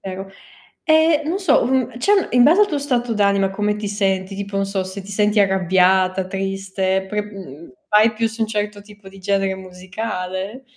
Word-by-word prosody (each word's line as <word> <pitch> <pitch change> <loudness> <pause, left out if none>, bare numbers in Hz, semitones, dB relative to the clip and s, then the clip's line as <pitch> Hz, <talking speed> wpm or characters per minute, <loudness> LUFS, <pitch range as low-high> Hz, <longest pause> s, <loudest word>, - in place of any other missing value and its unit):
vero. 190 0 -7 0.5
E 315 -1 +4
non 335 +5 -1
so, 365 -11 +3
mhmm, 255 -1 -1
cioè 400 +6 +2
in 245 -1 +5
base 330 +9 +5
al 415 - +4
tuo 295 -5 -2
stato 245 -4 -1
d'anima 200 -2 +2
come 210 +1 -1
ti 210 -1 -5
senti, 195 -1 -1
tipo 200 0 -6
non 195 0 0
so 195 -1 -2
se 190 +1 -7
ti 195 - -11
senti 210 +1 +2
arrabbiata, 190 0 +2
triste, 190 0 -2
pre 210 0 -2
mhmm, 170 -9 -11 0.2
vai 215 +2 +4
più 225 +1 0
su 225 +1 -8
un 220 - +1
certo 210 -1 -3
tipo 205 -1 -15
di 195 - -15
genere 195 0 0
musicale? 185 +3 -6
200 Hz, 190 wpm, -20 LUFS, 190-225 Hz, 0.5 s, in